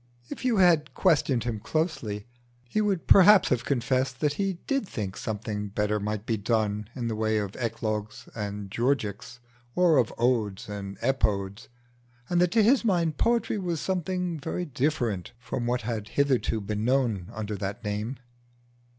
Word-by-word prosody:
If - - -6
you 245 -4 +2
had 170 -5 +4
questioned 145 - +2
him 115 -3 -2
closely, 130 - -2 0.4
he 215 - 0
would 200 -5 0
perhaps 200 +1 +7
have 125 -1 +1
confessed 130 0 0
that 150 -2 +1
he 195 +3 -1
did 275 -7 0
think 100 -4 -4
something 105 -1 -4
better 105 +1 0
might 105 +1 -3
be 115 -2 0
done 105 -1 -1
in 120 -3 -3
the 115 - -2
way 110 0 +1
of 100 -2 -3
Eclogues 110 -3 -3
and 100 -2 -5
Georgics, 120 -1 -1 0.4
or 175 -4 +4
of 120 - +1
Odes 115 -5 0
and 100 -1 -6
Epodes, 105 -6 0 0.6
and 175 0 +3
that 180 - +4
to 225 +3 +3
his 245 +5 +4
mind 170 -8 +1
poetry 230 -2 +1
was 175 -4 -2
something 180 -2 -2
very 165 +4 -3
different 125 - -1
from 120 0 -4
what 125 +1 0
had 110 -2 -3
hitherto 135 -5 +1
been 105 +1 -3
known 120 -7 +1
under 110 -1 -4
that 100 +3 -4
name. 105 +5 -3
120 Hz, 160 wpm, -27 LUFS, 105-160 Hz, 0.6 s, perhaps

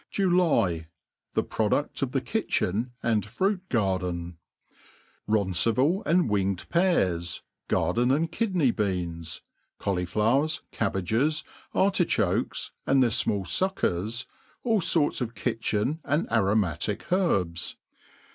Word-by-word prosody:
July.^Thi 170 - +2 0.6
Produei - - 0
of - - 0
the - - 0
Kitchen 110 +7 -1
and 110 -3 +2
Fruit 185 - -1
Garden. 90 -6 -1 0.9
RONCIVAL 110 - +2
artd 170 -1 +3
winged 100 -3 0
peas, 90 - +1 0.2
garden 120 +1 +1
and 155 +5 +1
kidney 185 - +1
beans, 85 -6 -3 0.4
Qaulifiowers, 105 - +1
cabbages, 115 - 0 0.3
airtichokes, 190 -3 +1 0.2
and 135 -1 +5
tbeiiLfmaH 115 -4 +1
fuckers, 115 - -1 0.4
all 225 -4 +2
iorts 165 -5 +2
of 115 -1 -3
kitchen 115 +5 -1
and 150 +4 0
aroit^.atic 105 - 0
herbs. 95 - +1
115 Hz, 95 wpm, -27 LUFS, 95-155 Hz, 0.9 s, and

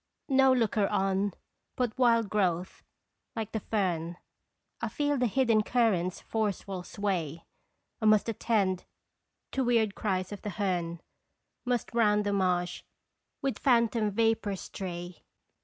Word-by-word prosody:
No 265 -1 +5
looker 225 -5 +2
on 195 0 +1 0.4
but 245 -4 -1
wild 235 -3 +3
growth, 185 -3 -1 0.5
like 220 -1 -3
the 220 - -2
fern, 175 -6 -1 0.6
I - - -1
feel 290 0 0
the 250 -2 +2
hidden 230 -1 +3
current's 210 -7 +1
forceful 200 -3 -2
sway; 175 -5 -3 0.6
I - - 0
must 215 0 +5
attend 200 -5 0 0.7
to 265 - 0
weird 230 -4 +2
cries 185 -3 -2
of 205 - -7
the 210 - -4
hern, 175 -4 -1 0.6
Must 245 -1 -1
round 210 -3 +3
the 205 - 0
marsh 180 -2 0 0.6
with 270 -1 -1
phantom 230 -4 +3
vapors 225 -2 0
stray. 175 -2 -6
210 Hz, 125 wpm, -29 LUFS, 185-230 Hz, 0.7 s, No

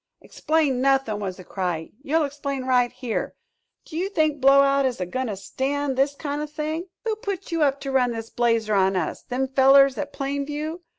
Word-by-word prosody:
"Explain 300 -5 0
nothin'!" 270 -6 +2
was 190 -3 -4
the 185 - -10
cry; 175 -3 -3
"you'll 310 +3 +1
explain 280 -1 -4
right 250 -2 +3
here! 245 -3 -4 0.5
Do 315 - -11
you 365 +4 -1
think 310 -7 0
Blowout 275 +1 +5
is 255 -5 -1
a 180 - -1
goin' 255 +8 -3
to 210 - -3
stand 270 +7 -2
this 275 +2 +1
kind 290 0 -4
o' 300 - -3
thing?" 310 +3 -4 0.2
"Who 445 -1 0
put 395 -3 -5
you 330 -1 0
up 280 -2 +2
to 275 - -4
run 255 -2 +3
this 225 -1 -6
blazer 230 -3 +1
on 190 -1 +3
us? 180 -4 -2
Them 260 +1 -2
fellers 270 +1 +5
at 290 -1 -4
Plain 280 0 -3
View? 305 +4 -4
275 Hz, 200 wpm, -24 LUFS, 245-295 Hz, 0.5 s, Blowout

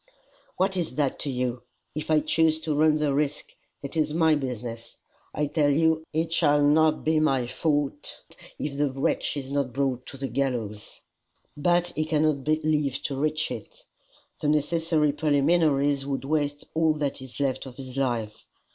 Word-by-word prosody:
"What 190 +1 +1
is 170 -3 -2
that 145 -3 0
to 145 - -2
you? 125 -2 -2 0.3
If 155 +1 -5
I 155 -1 +4
choose 160 +1 +2
to 155 -1 -1
run 155 +1 +4
the 150 -2 +1
risk, 145 +1 -1 0.3
it 140 - -6
is 155 -1 0
my 160 -1 +4
business. 120 -5 -4 0.3
I 150 - -1
tell 145 0 +1
you 160 +2 +2
it 160 +1 -1
shall 145 -3 +3
not 155 +1 +4
be 155 0 +2
my 135 -5 +2
fault 145 +1 -2 0.4
if 145 -1 -4
the 145 -2 +2
wretch 135 +2 -1
is 135 -1 -5
not 140 -3 -1
brought 130 -2 -1
to 135 - -7
the 135 0 -3
gallows." 120 -7 -3 0.5
"But 175 +3 +2
he 155 +1 0
cannot 155 -3 +1
live 155 -3 +1
to 140 - -2
reach 155 +2 -1
it. - - -8 0.6
The 150 - -2
necessary 155 0 +2
preliminaries 145 -1 +2
would 135 -2 -3
waste 145 -1 -1
all 160 -1 +3
that 145 -3 -2
is 130 0 -10
left 135 -1 -1
of 125 - -10
his 130 -2 -8
life. 115 -5 -2
145 Hz, 170 wpm, -26 LUFS, 135-155 Hz, 0.6 s, I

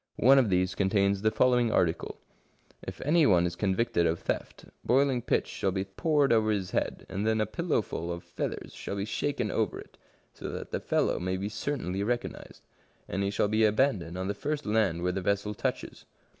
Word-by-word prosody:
One 135 +3 +6
of 120 -5 +2
these 90 0 +1
contains 100 0 +1
the 110 - +3
following 120 +1 +3
article: 85 -5 0 0.2
— - - -38
" - - -32
If - - -7
any 155 +2 +4
one 90 -3 +4
is 85 0 -2
convicted 95 -1 +1
of 80 +1 0
theft, - - -4 0.2
boiling 135 -1 +2
pitch - - +1
shall 95 - -2
be 95 0 -1
poured 140 +7 +2
over 110 -1 +3
his 100 -4 -1
head, - - -2
and 100 - -3
then 110 0 +1
a 110 - +2
pillowful 110 - -2
of 85 0 -5
feathers - - -5
shall - - -5
be 100 0 -2
shaken 120 +1 -2
over 110 -4 -1
it, - - -14 0.3
so - - -7
that - - -6
the - - -1
fellow - - 0
may 95 +1 -2
be 100 +2 -3
certainly 105 - -3
recognised. 120 +3 -4 0.4
And 95 - -2
he 100 - +1
shall 105 - +1
be 110 +1 +2
abandoned 105 -6 +1
on 95 0 -3
the 100 - -1
first 145 +7 -3
land 105 -6 +1
where 90 - +1
the 95 +1 -3
vessel 100 +2 0
touches." - - -4
105 Hz, 205 wpm, -29 LUFS, 95-120 Hz, 0.4 s, One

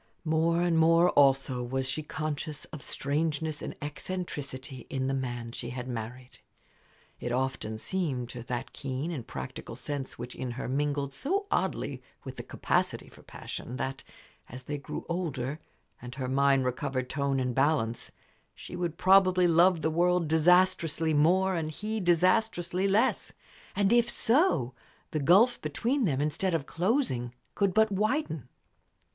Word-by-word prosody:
More 165 +2 +2
and 170 -2 +2
more, 165 +2 +5
also, 135 -2 +3
was 130 +2 -2
she 135 +3 -1
conscious 155 0 -4
of 155 - -6
strangeness 150 +1 -2
and - - -5
eccentricity 145 -5 -6
in 130 -1 -2
the 135 - 0
man 120 -3 -3
she 120 0 -6
had 125 0 -5
married. 125 +1 -7 0.8
It 120 - -3
often 125 -3 -2
seemed 135 -4 -2
to 120 - -7
that 120 0 -4
keen 135 +4 -4
and 135 -9 -5
practical 65 -1 -7
sense 140 -2 -4
which 120 +1 -7
in 125 -2 -4
her - - -4
mingled 140 +1 -1
so 390 - -1
oddly - - -1 0.2
with - - -8
the - - -4
capacity - - -1
for - - -17
passion 125 - -7
that, 135 0 -4 0.5
as 125 +2 -9
they 145 +2 -4
grew - - -6
older, 155 -5 -3 0.4
and 125 +1 -8
her 130 -2 -3
mind 135 0 +3
recovered 130 0 -2
tone 140 -1 0
and 125 -1 -1
balance, 135 -4 +1 0.4
she - - -9
would 175 -2 -3
probably 185 -1 +5
love 170 0 +4
the 160 - +2
world 175 +1 +2
disastrously 165 0 +3
more 185 +6 +4
and 165 -3 -1
he 215 +7 -4
disastrously 185 +1 +2
less. 200 +3 +1 0.4
And 200 +2 +3
if 240 0 +4
so, 230 - +2 0.4
the 155 - -1
gulf 195 - +5
between 235 - 0
them, 140 -6 +1
instead 165 +5 0
of 150 -4 -2
closing, 165 - 0 0.2
could 200 -2 +2
but 220 -1 +4
widen. 205 - -1
150 Hz, 150 wpm, -29 LUFS, 130-180 Hz, 0.8 s, more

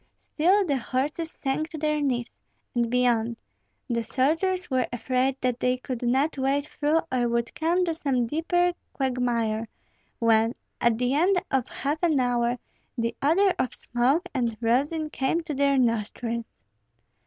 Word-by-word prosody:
Still 380 +6 +2
the 285 -5 +1
horses 290 +7 -2
sank 305 +2 -2
to 320 - -7
their 300 0 0
knees, 245 -4 -1 0.4
and 235 -1 +1
beyond. 235 -2 +1 0.5
The 235 -3 0
soldiers 325 - 0
were 255 -1 +2
afraid 255 +2 0
that 250 -1 0
they 250 0 +1
could 255 -1 -5
not 270 +5 +1
wade 275 +2 +1
through, 305 +2 +1
or 245 -2 +1
would 235 0 -1
come 345 +3 +1
to 335 - 0
some 275 -6 0
deeper 350 +6 +1 0.2
quagmire; 235 -4 0 0.5
when, 225 0 +3 0.3
at 235 -2 +3
the 250 +2 +1
end 360 +6 +3
of 265 -3 +1
half 295 +3 -3
an 320 -5 +3
hour, 245 -1 +1 0.4
the 230 0 -1
odor 365 +7 +4
of 255 -1 0
smoke 265 +9 +1
and 235 -5 -1
rosin 285 +7 +1
came 270 +6 0
to 320 -2 -5
their 280 0 +2
nostrils. 230 -1 0
260 Hz, 155 wpm, -26 LUFS, 240-310 Hz, 0.5 s, odor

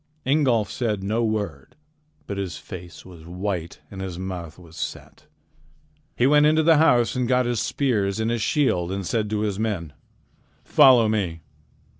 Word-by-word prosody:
Ingolf 130 -7 +2
said 110 -6 -2
no 110 +4 0
word, 100 -11 -3 0.5
but 100 -1 -5
his 95 -3 -4
face 90 -2 -10
was 85 -4 -13
white, 90 0 -5
and 95 -1 -7
his 95 -3 -5
mouth 90 -4 -6
was 85 -3 -15
set. - - -7 0.9
He 120 - +2
went 150 +2 +5
into 155 +1 +3
the 160 0 +5
house 125 -7 +3
and 125 -1 0
got 125 0 +2
his 120 -2 -1
spears 105 -8 0
and 110 +1 0
his 120 -2 -1
shield 95 - +1
and 95 0 -3
said 110 +2 -1
to 105 0 -1
his 105 -2 -2
men: 95 -9 -3 0.7
"Follow 130 -6 +6
me." 95 -7 -2
105 Hz, 165 wpm, -23 LUFS, 90-120 Hz, 0.9 s, Follow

